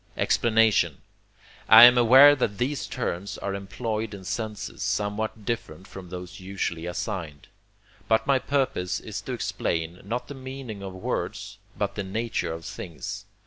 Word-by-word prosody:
Explanation 115 Hz, -2 st, +2 dB, 0.7 s
I 110 Hz, +2 st, +11 dB
am 125 Hz, +1 st, +10 dB
aware 130 Hz, +5 st, +8 dB
that 105 Hz, -7 st, -1 dB
these 135 Hz, +4 st, -2 dB
terms 100 Hz, -6 st, -4 dB
are 100 Hz, -, -4 dB
employed 105 Hz, +2 st, -4 dB
in 95 Hz, -, -11 dB
senses 105 Hz, +3 st, -5 dB
somewhat 105 Hz, +1 st, -2 dB
different 95 Hz, -7 st, -4 dB
from 95 Hz, -2 st, -10 dB
those 90 Hz, +1 st, -8 dB
usually 90 Hz, -3 st, -4 dB
assigned. 90 Hz, -5 st, -5 dB, 0.6 s
But 110 Hz, 0 st, +2 dB
my 135 Hz, -1 st, +3 dB
purpose 130 Hz, -11 st, -1 dB
is -, -, -6 dB
to -, -, -5 dB
explain, 85 Hz, +1 st, -3 dB
not 120 Hz, +5 st, -4 dB
the -, -, -7 dB
meaning 130 Hz, -5 st, -8 dB
of 95 Hz, -1 st, -6 dB
words, 95 Hz, -, -4 dB, 0.2 s
but 100 Hz, -1 st, -1 dB
the 100 Hz, -, -4 dB
nature 100 Hz, -3 st, -2 dB
of 80 Hz, 0 st, -7 dB
things. 80 Hz, -7 st, -7 dB
105 Hz, 145 wpm, -26 LUFS, 90-120 Hz, 0.7 s, I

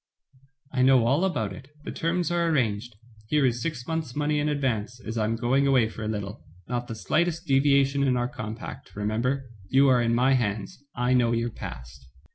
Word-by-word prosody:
"I 130 Hz, -, 0 dB
know 130 Hz, -2 st, +5 dB
all 140 Hz, +9 st, +2 dB
about 125 Hz, -, -1 dB
it, 125 Hz, +8 st, -11 dB, 0.2 s
the -, -, -5 dB
terms 175 Hz, +1 st, -1 dB
are 170 Hz, -1 st, +1 dB
arranged. 120 Hz, -6 st, 0 dB, 0.3 s
Here 150 Hz, +3 st, +2 dB
is 120 Hz, -1 st, 0 dB
six 140 Hz, -6 st, -3 dB
months* 160 Hz, -5 st, -3 dB
money 150 Hz, 0 st, +1 dB
in 150 Hz, +1 st, 0 dB
advance, 120 Hz, -5 st, -1 dB
as 115 Hz, -2 st, -6 dB
I 110 Hz, -2 st, +1 dB
am 115 Hz, +1 st, 0 dB
going 130 Hz, +4 st, +2 dB
away 130 Hz, -5 st, +4 dB
for 110 Hz, -, -9 dB
a 105 Hz, -, -3 dB
little. 105 Hz, 0 st, -4 dB, 0.2 s
Not 120 Hz, 0 st, -3 dB
the 115 Hz, -, -5 dB
slightest 170 Hz, -, 0 dB
devia 140 Hz, 0 st, +4 dB
tion 140 Hz, +1 st, -2 dB
in 130 Hz, -2 st, +2 dB
our 120 Hz, 0 st, 0 dB
compact, 110 Hz, -3 st, -8 dB
remember. 115 Hz, +5 st, -1 dB, 0.2 s
You 135 Hz, +1 st, +5 dB
are 125 Hz, -2 st, +4 dB
in 115 Hz, 0 st, +2 dB
my 130 Hz, +3 st, +4 dB
hands, 110 Hz, 0 st, -2 dB
I 125 Hz, +1 st, +1 dB
know 120 Hz, -2 st, +3 dB
your 115 Hz, 0 st, -1 dB
past." 65 Hz, -, -9 dB
125 Hz, 205 wpm, -26 LUFS, 115-140 Hz, 0.3 s, know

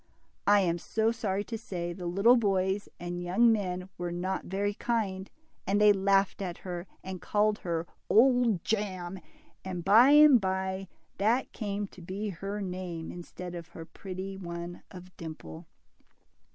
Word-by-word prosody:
I 205 Hz, 0 st, +6 dB
am 175 Hz, -2 st, 0 dB
sorry 215 Hz, +2 st, 0 dB
to 225 Hz, +1 st, -5 dB
say 175 Hz, -5 st, -4 dB
the 180 Hz, -1 st, -6 dB
little 200 Hz, +8 st, +5 dB
boys 195 Hz, -3 st, +1 dB
and 175 Hz, 0 st, -4 dB
young 195 Hz, +7 st, +4 dB
men 185 Hz, -4 st, -1 dB
were 175 Hz, -1 st, -2 dB
not 185 Hz, +2 st, -3 dB
very 200 Hz, +2 st, -1 dB
kind, 200 Hz, -4 st, -2 dB, 0.4 s
and 200 Hz, +2 st, +2 dB
they 210 Hz, 0 st, +7 dB
laughed 195 Hz, 0 st, +2 dB
at 180 Hz, -3 st, -4 dB
her, 175 Hz, 0 st, -5 dB, 0.2 s
and 185 Hz, -2 st, -6 dB
called 210 Hz, 0 st, +1 dB
her 170 Hz, -2 st, -2 dB, 0.2 s
Old 240 Hz, -5 st, +4 dB
Jam," 190 Hz, -4 st, -2 dB, 0.4 s
and 180 Hz, -3 st, -5 dB
by 225 Hz, +7 st, +7 dB
and 295 Hz, -4 st, +8 dB
by 190 Hz, 0 st, -2 dB, 0.3 s
that 225 Hz, +6 st, +2 dB
came 205 Hz, -2 st, -3 dB
to 185 Hz, -, -14 dB
be 195 Hz, +5 st, -4 dB
her 200 Hz, +3 st, -5 dB
name 180 Hz, -3 st, -5 dB
instead 175 Hz, 0 st, -8 dB
of 170 Hz, -2 st, -7 dB
her 165 Hz, 0 st, -10 dB
pretty 190 Hz, +2 st, -7 dB
one 170 Hz, -1 st, -6 dB
of 185 Hz, -1 st, -12 dB
Dimple. 155 Hz, -, -9 dB
190 Hz, 150 wpm, -29 LUFS, 175-205 Hz, 0.4 s, and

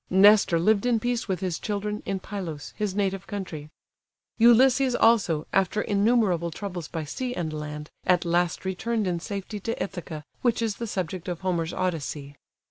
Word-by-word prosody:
Nestor 195 Hz, -2 st, +6 dB
lived 205 Hz, +6 st, +3 dB
in 235 Hz, -2 st, +3 dB
peace 240 Hz, +1 st, -1 dB
with 190 Hz, -2 st, -2 dB
his 180 Hz, -3 st, -2 dB
children, 210 Hz, 0 st, -3 dB
in 195 Hz, -1 st, -1 dB
Pylos, 180 Hz, -7 st, -6 dB
his 205 Hz, -3 st, -2 dB
native 195 Hz, -1 st, -1 dB
country. 170 Hz, -7 st, -6 dB, 0.7 s
Ulysses 250 Hz, +2 st, +5 dB
also, 200 Hz, -11 st, +3 dB
after 195 Hz, +2 st, +2 dB
innumerable 205 Hz, -5 st, +2 dB
troubles 175 Hz, -1 st, -6 dB
by 165 Hz, -2 st, -4 dB
sea 250 Hz, -, -4 dB
and 160 Hz, -3 st, -3 dB
land, 150 Hz, 0 st, -6 dB, 0.2 s
at 180 Hz, -1 st, +3 dB
last 175 Hz, +1 st, 0 dB
returned 215 Hz, +4 st, -1 dB
in 175 Hz, -2 st, -1 dB
safety 200 Hz, +2 st, -5 dB
to 230 Hz, +4 st, -3 dB
Ithaca, 160 Hz, -5 st, -5 dB, 0.2 s
which 240 Hz, -2 st, +2 dB
is 225 Hz, -3 st, -1 dB
the 235 Hz, -, -4 dB
subject 185 Hz, -3 st, -4 dB
of 175 Hz, -1 st, -4 dB
Homer's 175 Hz, -3 st, -1 dB
Odyssey. 150 Hz, -6 st, -3 dB
190 Hz, 165 wpm, -26 LUFS, 170-215 Hz, 0.7 s, Nestor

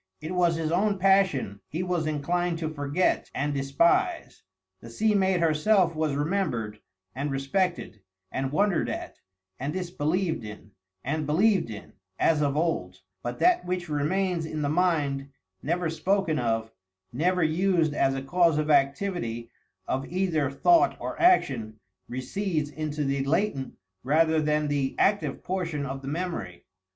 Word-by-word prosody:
It 155 Hz, -, -6 dB
was 175 Hz, -2 st, +2 dB
his 160 Hz, -1 st, -2 dB
own 200 Hz, +3 st, +2 dB
passion 185 Hz, -, +2 dB
he 165 Hz, +4 st, -3 dB
was 175 Hz, -3 st, -1 dB
inclined 170 Hz, +3 st, -1 dB
to 160 Hz, -1 st, -3 dB
forget 145 Hz, +4 st, 0 dB
and 145 Hz, +2 st, -1 dB
despise; 140 Hz, +4 st, +1 dB, 0.4 s
the 115 Hz, -, -11 dB
sea 215 Hz, -, +1 dB
maid 190 Hz, -3 st, +2 dB
herself 165 Hz, +3 st, +3 dB
was 155 Hz, -2 st, -1 dB
remembered, 145 Hz, -, -1 dB, 0.3 s
and 140 Hz, +3 st, -3 dB
respected, 135 Hz, -, -1 dB, 0.3 s
and 135 Hz, 0 st, -2 dB
wondered 195 Hz, +2 st, +1 dB
at, -, -, -6 dB, 0.4 s
and 140 Hz, +3 st, -3 dB
disbelieved 175 Hz, -3 st, -1 dB
in, 105 Hz, 0 st, -10 dB, 0.3 s
and 150 Hz, +2 st, -2 dB
believed 190 Hz, -, +3 dB
in, 105 Hz, -2 st, -9 dB, 0.2 s
as 155 Hz, -2 st, +2 dB
of 145 Hz, -1 st, +1 dB
old, 95 Hz, -, -1 dB, 0.2 s
but 120 Hz, +3 st, -4 dB
that 360 Hz, 0 st, +3 dB
which 180 Hz, -1 st, -3 dB
remains 165 Hz, +3 st, 0 dB
in 155 Hz, -1 st, -3 dB
the 145 Hz, -, 0 dB
mind, 150 Hz, -5 st, +1 dB, 0.3 s
never 170 Hz, +4 st, -1 dB
spoken 165 Hz, 0 st, 0 dB
of, 115 Hz, -2 st, -1 dB, 0.4 s
never 180 Hz, +6 st, +1 dB
used 165 Hz, -1 st, +2 dB
as 135 Hz, -2 st, +1 dB
a 135 Hz, -, -4 dB
cause 165 Hz, +2 st, +3 dB
of 155 Hz, 0 st, +1 dB
activity 140 Hz, -5 st, 0 dB, 0.4 s
of 135 Hz, +1 st, -2 dB
either 175 Hz, -6 st, 0 dB
thought 340 Hz, -, +3 dB
or -, -, -5 dB
action, 125 Hz, -, +3 dB, 0.3 s
recedes 150 Hz, +4 st, -2 dB
into 150 Hz, 0 st, -3 dB
the 135 Hz, -1 st, 0 dB
latent 145 Hz, -2 st, -1 dB, 0.3 s
rather 160 Hz, +4 st, +3 dB
than 150 Hz, 0 st, +1 dB
the 140 Hz, -2 st, -1 dB
active 205 Hz, +1 st, +1 dB
portion 170 Hz, -6 st, -2 dB
of 135 Hz, 0 st, -5 dB
the 135 Hz, -, -9 dB
memory. 145 Hz, -, -4 dB
155 Hz, 145 wpm, -27 LUFS, 140-180 Hz, 0.4 s, herself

